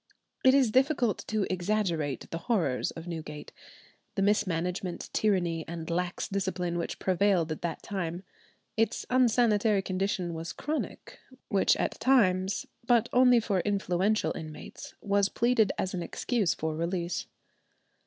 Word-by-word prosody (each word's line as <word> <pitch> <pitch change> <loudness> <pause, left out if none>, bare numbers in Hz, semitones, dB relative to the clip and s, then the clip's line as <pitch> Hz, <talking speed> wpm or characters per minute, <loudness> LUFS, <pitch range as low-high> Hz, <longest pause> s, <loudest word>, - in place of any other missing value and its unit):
It 260 +1 +6
is 260 -5 +4
difficult 260 -3 +2
to 215 -2 0
exaggerate 175 - -1
the 165 - -3
horrors 170 - 0
of 165 - -8
Newgate, 160 -3 -7 0.6
the 195 - +1
mismanagement, 180 -3 -1
tyranny, 175 -6 +1
and 165 -1 -6
lax 175 +1 -1
discipline 185 -3 -2
which 170 - -3
prevailed 185 -3 +2
at 155 - -4
that 165 -2 -4
time. 180 -2 -4 0.5
Its 225 +1 0
unsanitary 225 -5 +3
condition 185 -2 -1
was 165 +1 -5
chronic, 310 +1 -5 0.3
which 195 -2 +3
at - - -2
times, 200 -7 +3 0.2
but 240 -2 +4
only 250 -1 +6
for 205 -4 0
influential 200 +1 0
inmates, 155 -1 -9
was 200 0 +2
pleaded 235 -3 +2
as 190 - -2
an 180 - -2
excuse 215 +1 0
for 160 0 -3
release. 170 +1 -2
190 Hz, 135 wpm, -29 LUFS, 170-215 Hz, 0.6 s, It